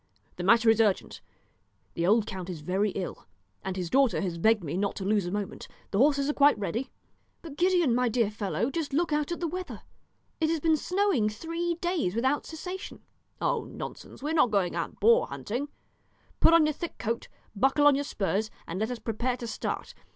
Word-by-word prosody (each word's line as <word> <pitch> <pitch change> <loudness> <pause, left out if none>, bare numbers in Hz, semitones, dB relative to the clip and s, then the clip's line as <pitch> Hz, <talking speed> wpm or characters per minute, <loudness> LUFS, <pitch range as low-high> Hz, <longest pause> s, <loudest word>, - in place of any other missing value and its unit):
The 175 - -4
matter 230 +4 +5
is 225 0 +3
urgent; 205 -4 0 0.7
the 170 +1 -1
old 215 +2 +4
count 190 -2 -6
is 170 -4 -6
very 190 +6 0
ill, 185 -3 -5 0.4
and 190 0 -4
his 180 -2 -2
daughter 270 -2 +3
has 175 -4 -3
begged 220 +1 +3
me 155 +1 -3
not 200 +1 -1
to 190 - -5
lose 205 -2 +1
a - - -3
moment. 205 0 -4 0.2
The 195 - 0
horses 280 +1 +4
are 295 - +1
quite 285 -3 +5
ready." 210 +6 -3 0.5
"But, 315 -4 -8
Gideon, 350 -5 +3
my 250 0 +2
dear 225 -2 +1
fellow, 215 +4 -2
just 320 -3 -3
look 325 +1 +1
out 300 +2 0
at 345 - -3
the 340 - 0
weather; 365 +3 -6 0.6
it 315 -1 +2
has 325 -1 +1
been 320 +1 +3
snowing 360 - +1
three 335 +9 -3
days 340 - -1
without 260 +5 +1
cessation." 360 +4 -7 0.4
"Oh, - - 0
nonsense; - - -9
we 300 - -1
are - - 0
not 300 -7 +4
going 195 -4 +1
out - - -4
boar 470 +1 +5
hunting; 245 +7 -4 0.7
put - - +6
on 330 -2 +6
your 305 - +1
thick 340 +3 -6
coat, 230 0 -3 0.3
buckle 270 +7 +3
on 290 - +8
your 280 +1 0
spurs, 215 -4 -1 0.2
and 175 +3 -5
let 220 +2 0
us 250 - -3
prepare 240 +3 -2
to 240 - -6
start. 225 - -4
245 Hz, 205 wpm, -28 LUFS, 205-310 Hz, 0.7 s, on